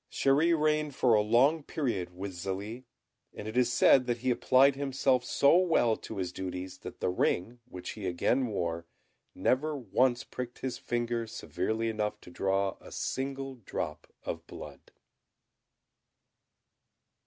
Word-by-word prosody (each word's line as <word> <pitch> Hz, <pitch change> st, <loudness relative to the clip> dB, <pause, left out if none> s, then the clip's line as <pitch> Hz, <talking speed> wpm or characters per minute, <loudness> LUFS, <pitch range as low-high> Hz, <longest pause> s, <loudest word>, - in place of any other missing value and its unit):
Chéri 155 Hz, +5 st, +3 dB
reigned 150 Hz, -2 st, +1 dB
for 125 Hz, -3 st, +3 dB
a 105 Hz, -, +5 dB
long 125 Hz, +9 st, +4 dB
period 100 Hz, -, -3 dB
with 100 Hz, +1 st, -4 dB
Zélie; 100 Hz, +7 st, -5 dB, 0.5 s
and 105 Hz, -, -7 dB
it 110 Hz, -, -6 dB
is 125 Hz, -1 st, +3 dB
said 125 Hz, 0 st, +5 dB
that 120 Hz, -1 st, 0 dB
he 125 Hz, +2 st, 0 dB
applied 130 Hz, +3 st, +4 dB
himself 135 Hz, -2 st, +1 dB
so 140 Hz, +4 st, +4 dB
well 165 Hz, -11 st, +3 dB
to 110 Hz, -, -8 dB
his 90 Hz, -2 st, -2 dB
duties, 90 Hz, 0 st, -6 dB
that -, -, -9 dB
the -, -, +1 dB
ring, 95 Hz, +5 st, 0 dB
which 90 Hz, -7 st, -7 dB
he 105 Hz, -3 st, -5 dB
again 120 Hz, +9 st, +1 dB
wore, 85 Hz, -5 st, -3 dB, 0.5 s
never 150 Hz, +3 st, +1 dB
once 125 Hz, -1 st, +1 dB
pricked 125 Hz, -1 st, -6 dB
his 130 Hz, -2 st, -3 dB
finger 120 Hz, -1 st, -2 dB
severely 110 Hz, +1 st, -2 dB
enough 105 Hz, -1 st, -2 dB
to -, -, -13 dB
draw 95 Hz, +1 st, 0 dB
a -, -, -13 dB
single 135 Hz, 0 st, -3 dB
drop 75 Hz, -4 st, -5 dB
of -, -, -5 dB
blood. -, -, -10 dB
120 Hz, 145 wpm, -30 LUFS, 95-135 Hz, 0.5 s, a